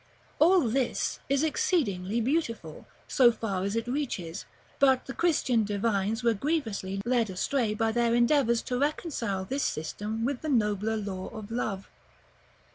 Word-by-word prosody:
§ -, -, -32 dB, 0.4 s
L. 315 Hz, -, +8 dB
All 375 Hz, -, +6 dB
this 250 Hz, +1 st, 0 dB
is 275 Hz, +1 st, +2 dB
exceedingly 235 Hz, -, 0 dB
beautiful, 230 Hz, -, -2 dB, 0.2 s
so 245 Hz, -3 st, +5 dB
far 200 Hz, -5 st, -3 dB
as 200 Hz, +2 st, -2 dB
it 230 Hz, -, -1 dB
reaches; 235 Hz, -, -3 dB, 0.3 s
but 265 Hz, -2 st, +4 dB
the 265 Hz, -, -6 dB
Christian 265 Hz, -9 st, +2 dB
divines 210 Hz, +2 st, -1 dB
were 235 Hz, -1 st, +4 dB
grievously 215 Hz, -7 st, -2 dB
led 240 Hz, -3 st, +2 dB
astray 215 Hz, +4 st, 0 dB
by 225 Hz, +1 st, +1 dB
their 235 Hz, 0 st, +2 dB
endeavors 240 Hz, -1 st, +3 dB
to 250 Hz, 0 st, -2 dB
reconcile 265 Hz, -, -1 dB
this 270 Hz, +7 st, -2 dB
system 210 Hz, +8 st, -3 dB
with 270 Hz, -1 st, -2 dB
the 310 Hz, -, -3 dB
nobler 215 Hz, -3 st, +1 dB
law 195 Hz, -3 st, -4 dB
of 220 Hz, -1 st, -9 dB
love. 205 Hz, -5 st, -3 dB
230 Hz, 155 wpm, -28 LUFS, 205-265 Hz, 0.4 s, L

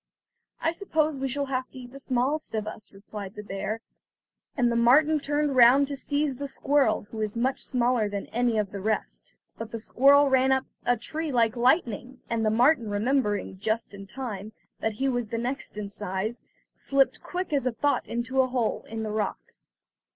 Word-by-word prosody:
"I 325 Hz, -, +1 dB
suppose 315 Hz, -5 st, 0 dB
we 270 Hz, -, -1 dB
shall 280 Hz, +2 st, -2 dB
have 260 Hz, -1 st, -2 dB
to 260 Hz, -, -11 dB
eat 245 Hz, 0 st, -11 dB
the 275 Hz, -, -10 dB
smallest 265 Hz, +1 st, -1 dB
of 215 Hz, -1 st, -1 dB
us," 215 Hz, -1 st, -8 dB
replied 200 Hz, 0 st, -9 dB
the 210 Hz, -, -7 dB
bear, 205 Hz, +3 st, -4 dB, 0.8 s
and 240 Hz, -2 st, +3 dB
the -, -, 0 dB
marten 290 Hz, +7 st, +5 dB
turned 290 Hz, 0 st, 0 dB
round 255 Hz, +3 st, +7 dB
to 285 Hz, -, -3 dB
seize 285 Hz, 0 st, -1 dB
the 280 Hz, +1 st, -4 dB
squirrel 275 Hz, -3 st, +1 dB
who 225 Hz, -, -7 dB
was 215 Hz, 0 st, -2 dB
much 260 Hz, +3 st, 0 dB
smaller 245 Hz, -4 st, +1 dB
than 200 Hz, -1 st, -4 dB
any 240 Hz, -1 st, +1 dB
of 205 Hz, -2 st, 0 dB
the 200 Hz, -, -5 dB
rest. 215 Hz, +2 st, -3 dB, 0.2 s
But 225 Hz, -1 st, -5 dB
the 230 Hz, -, -5 dB
squirrel 280 Hz, +5 st, +5 dB
ran 265 Hz, 0 st, +3 dB
up 265 Hz, 0 st, +2 dB, 0.2 s
a 245 Hz, 0 st, +4 dB
tree 310 Hz, +7 st, -4 dB
like 235 Hz, -2 st, +2 dB
lightning, 250 Hz, -, +1 dB
and 230 Hz, -1 st, 0 dB
the 215 Hz, -, +3 dB
marten 240 Hz, +1 st, +3 dB
remembering, 205 Hz, -3 st, 0 dB
just 220 Hz, +2 st, -2 dB
in 195 Hz, 0 st, -9 dB
time, 215 Hz, -3 st, -6 dB, 0.3 s
that 220 Hz, -, -1 dB
he 265 Hz, +6 st, -1 dB
was 245 Hz, -3 st, -1 dB
the 230 Hz, -, -3 dB
next 245 Hz, -1 st, -4 dB
in 210 Hz, -1 st, -3 dB
size, 205 Hz, +3 st, -4 dB, 0.3 s
slipped 275 Hz, -1 st, +1 dB
quick 360 Hz, -2 st, -4 dB
as 275 Hz, -3 st, +1 dB
thought 285 Hz, -3 st, +1 dB
into 250 Hz, +3 st, 0 dB
a 260 Hz, -, +1 dB
hole 245 Hz, -3 st, -1 dB
in 225 Hz, 0 st, -4 dB
the 215 Hz, -, -3 dB
rocks. 210 Hz, -1 st, -4 dB
245 Hz, 195 wpm, -27 LUFS, 215-275 Hz, 0.8 s, round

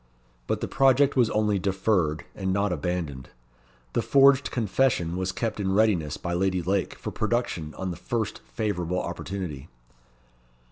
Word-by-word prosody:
But -, -, -1 dB
the -, -, -1 dB
project 135 Hz, +1 st, +4 dB
was 120 Hz, -4 st, +4 dB
only 105 Hz, -2 st, +1 dB
deferred, 95 Hz, -4 st, 0 dB
and 95 Hz, -1 st, -2 dB
not 100 Hz, 0 st, +1 dB
abandoned. 80 Hz, -5 st, -3 dB, 0.6 s
The 120 Hz, -, +1 dB
forged 140 Hz, +2 st, +5 dB
confession 110 Hz, -6 st, +1 dB
was 95 Hz, 0 st, -1 dB
kept 110 Hz, +3 st, -3 dB
in 95 Hz, -1 st, 0 dB
readiness 95 Hz, -9 st, +2 dB
by 85 Hz, -, -4 dB
Lady 90 Hz, 0 st, 0 dB
Lake 95 Hz, +2 st, 0 dB
for -, -, -6 dB
production 110 Hz, -9 st, -2 dB
on 95 Hz, -1 st, -3 dB
the 85 Hz, -, -6 dB
first 110 Hz, +2 st, -3 dB
favourable 90 Hz, -5 st, -2 dB
opportunity. 85 Hz, -5 st, -5 dB
95 Hz, 145 wpm, -26 LUFS, 85-110 Hz, 0.6 s, forged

